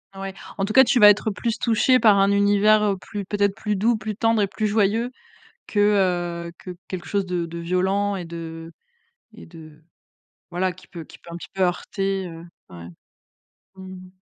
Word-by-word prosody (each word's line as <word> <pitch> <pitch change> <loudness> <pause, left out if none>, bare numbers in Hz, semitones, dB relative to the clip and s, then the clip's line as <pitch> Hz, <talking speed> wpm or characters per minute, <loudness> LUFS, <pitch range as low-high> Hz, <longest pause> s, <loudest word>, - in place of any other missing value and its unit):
Ouais. 195 0 -6 0.2
En 195 - -1
tout 215 - -4
cas, 265 - +8
tu 245 +1 +2
vas 210 0 +9
être 210 +1 +2
plus 230 +2 -3
touché 245 +2 +3
par 215 -3 +5
un 195 +1 +3
univers, 205 +1 +4
heu, 200 -2 0
plus 200 +1 -7
peut-être 200 0 0
plus 210 -1 -2
doux, 220 +4 +1
plus 215 -1 -5
tendre 225 -1 +1
et 200 - +1
plus 215 +2 -3
joyeux 220 +4 +1 0.6
que, 205 - -2 0.7
heu, - - -8
que 185 - -8 0.2
quelque 185 -2 -6
chose 200 -2 -1
de 175 -2 -2
de 170 +1 -8
violent 190 +4 0
et 180 -2 -5
de 165 0 -8 0.6
et 225 - -13
de 155 -2 -15 0.7
voilà, 180 +1 -1
qui 185 - -18
peut 170 -2 -9
qui - - -16
peut 170 - -15
un - - -6
petit - - -10
peu 190 - -1
heurter. 195 +1 -1
Heu, 165 0 -10 0.3
ouais. 85 -1 -10 0.9
Mmh 190 - -11 0.2
mh. - - -18
195 Hz, 200 wpm, -23 LUFS, 175-210 Hz, 0.9 s, vas